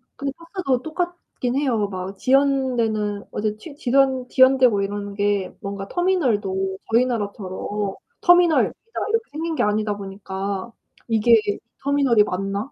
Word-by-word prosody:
근데 280 0 -3
버스도 335 -7 -2
똑같기는 315 -6 -3
해요. 230 -8 +1
막 185 0 -5
지연되는 245 -6 +1
어 - - -4
저 215 0 -1
지 285 +6 -11
지연 265 -2 +2
지연되고 260 -6 +5
이러는 200 0 -4
게 205 -2 0
뭔가 200 0 -5
터미널도 210 - 0 0.2
저희 245 +2 +5
나라처럼 205 -3 -3 0.3
'터미널.' 350 -2 +5 0.2
딱 - - -2
이렇게 455 +1 +1
생긴 320 +2 -3
게 - - +1
아니다 210 0 0
보니까' 195 +1 -5 0.4
이게 225 +1 +5 0.4
터미널이 275 -6 +4
맞나?' 195 +5 -3
225 Hz, 305 characters per minute, -22 LUFS, 200-275 Hz, 0.4 s, 지연되고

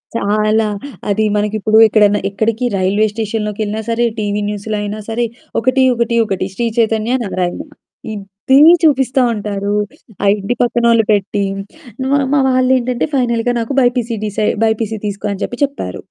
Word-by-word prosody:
చాలా. 215 +1 +1 0.4
అది 215 +2 +1
మనకి 210 +1 0
ఇప్పుడు 215 +2 +2
ఎక్కడన్నా 210 -1 +3
ఎక్కడికి 225 +4 -1
రైల్వే 200 +3 +2
స్టేషన్‌లోకెళ్ళినా 215 -1 -3
సరే, 235 +1 +1
టీవీ 205 0 -1
న్యూస్‌లో 210 +1 -4
అయినా 210 +1 -4
సరే, 235 +2 0 0.3
"ఒకటి 255 +3 +2
ఒకటి 235 0 0
ఒకటి 195 -2 -2
శ్రీ 235 +3 -1
చైతన్య, 225 +2 +1
నారాయణ" 180 -2 -2 0.5
ఇదే 200 +6 0 0.3
చూపిస్తా 270 -3 +3
ఉంటారు. 205 -1 -3 0.5
ఆ - - +1
ఇంటి 200 +5 -2
పక్కనోళ్ళు 235 -2 +3
పెట్టి 205 0 0 0.7
మా 285 - +3
మా 290 - +4
వాళ్ళేంటంటే 255 0 +1
ఫైనల్‌గా 245 -1 +1
నాకు 230 +4 -3
బైపీసీ 245 -2 0
డిసై 210 0 -1 0.2
బైపీసీ 220 -1 -1
తీసుకో 205 +1 -4
అని 195 - -8
చెప్పి 245 - -8
చెప్పారు. 280 +1 -7
220 Hz, 140 wpm, -16 LUFS, 205-240 Hz, 0.7 s, మా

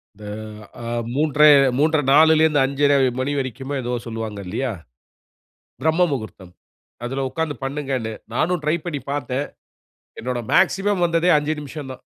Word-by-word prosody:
இந்த 105 +1 -12 0.6
அ - - -6 0.3
மூன்ரை 150 +1 +5 0.3
3.30, 155 0 +2
4, 155 0 +5
5.30 140 +1 +2 0.2
மணி 130 +2 -1
வரைக்குமோ, 135 +2 -4
ஏதோ 120 +1 -3
சொல்லுவாங்க 110 -2 -5
இல்லையா? 120 +7 -2 1.1
பிரம்ம 160 +3 +3
முகூர்த்தம். 110 -8 -6 0.5
அதுல 135 +2 -2
உட்காந்து 160 0 -2
பண்ணுங்கன்னு, 135 -5 -3 0.2
நானும் 170 +5 0
ட்ரை 155 +2 +2
பண்ணி 150 -5 -3
பார்த்தேன். 140 0 -2 0.7
என்னோட 125 +1 -3
மேக்ஸிமம் 195 -1 +2
வந்ததே 170 +1 +2
5 150 +1 -1
நிமிஷந்தான். 140 -3 -8
145 Hz, 125 wpm, -21 LUFS, 130-155 Hz, 1.1 s, மூன்ரை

